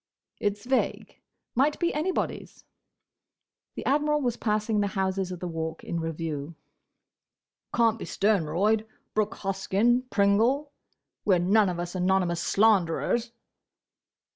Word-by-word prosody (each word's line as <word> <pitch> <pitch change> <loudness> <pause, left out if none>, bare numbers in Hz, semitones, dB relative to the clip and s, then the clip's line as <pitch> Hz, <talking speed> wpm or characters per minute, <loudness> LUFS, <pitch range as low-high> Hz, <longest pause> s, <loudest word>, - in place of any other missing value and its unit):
"It's 205 +1 -2
vague: 260 +1 -1 0.3
might 280 +4 +2
be 345 -1 +1
anybody's." 335 +5 -3 1.1
The - - -6
Admiral 300 +1 +2
was 245 -3 0
passing 215 0 0
the 205 - +1
houses 190 -1 -1
of 180 - -6
the 180 - -4
Walk 160 -1 -4
in 170 - -3
review. 160 -1 -4 1.2
"Can't 230 -1 +2
be - - -5
Sternroyd—Brooke 210 +3 0
Hoskyn—Pringle—We 215 +3 0
're - - +3
none 195 +3 +3
of 175 -1 -4
us 175 0 -4
anonymous 180 -2 +1
slanderers." 215 +3 +2
205 Hz, 110 wpm, -27 LUFS, 180-230 Hz, 1.2 s, re